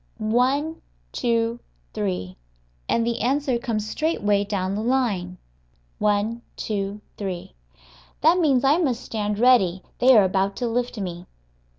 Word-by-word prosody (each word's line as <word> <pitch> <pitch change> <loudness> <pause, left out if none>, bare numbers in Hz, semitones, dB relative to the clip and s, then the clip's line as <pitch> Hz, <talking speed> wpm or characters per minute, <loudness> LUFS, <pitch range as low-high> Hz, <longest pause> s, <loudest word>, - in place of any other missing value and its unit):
one, 280 +6 +1 0.3
two, 230 - 0 0.3
three. 90 -2 -3 0.5
And 230 - +2
the 235 0 -1
answer 260 +1 +1
comes 220 -4 -2
straightway 210 -8 +1
down 195 -2 -2
the 205 - -2
line 220 -8 0 0.6
one, 210 +3 +1
two, 205 -1 -3 0.2
three. 185 - -5 0.7
That 335 +4 +5
means 275 -7 +3
I 285 +5 +4
must 260 -8 0
stand 210 -2 -2
ready; 200 -7 +4 0.2
they 255 -1 +7
are 210 - +7
about 195 +1 +1
to 245 - -2
lift 245 +1 -2
me. 180 -3 -5
225 Hz, 130 wpm, -24 LUFS, 195-250 Hz, 0.7 s, they